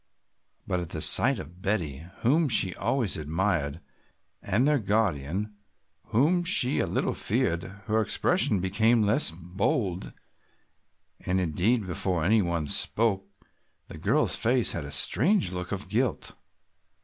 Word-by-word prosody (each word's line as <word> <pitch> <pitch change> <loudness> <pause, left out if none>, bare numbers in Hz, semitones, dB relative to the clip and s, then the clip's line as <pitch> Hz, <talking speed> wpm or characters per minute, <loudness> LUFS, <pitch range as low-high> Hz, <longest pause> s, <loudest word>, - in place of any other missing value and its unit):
But 90 - -1
at 85 -2 -6
the 80 - -6
sight - - +3
of 85 +5 -10
Betty, 80 -8 -2 0.2
whom 150 +6 +2
she 95 -6 +3
always 120 -9 -1
admired, 80 -1 -2 0.6
and 120 +8 +1
their 150 -1 +2
guardian, 100 - -1 0.5
whom 155 +11 +2
she 145 -7 +3
a - - 0
little - - -1
feared, 85 +1 0 0.2
her 110 -1 +1
expression 120 - +2
became 110 +5 +2
less 105 +8 +1
bold 90 +3 -3 1.1
and, 95 0 0
indeed, 95 +7 0
before 90 -1 -2
any 110 +3 +4
one 85 -4 -2
spoke 100 +4 0 0.6
the - - -10
girl's - - +1
face 120 +1 +2
had 85 - -4
a 70 - -8
strange 175 - +2
look 90 -1 -6
of 95 -1 -4
guilt. 115 +3 -2
100 Hz, 135 wpm, -27 LUFS, 85-115 Hz, 1.1 s, any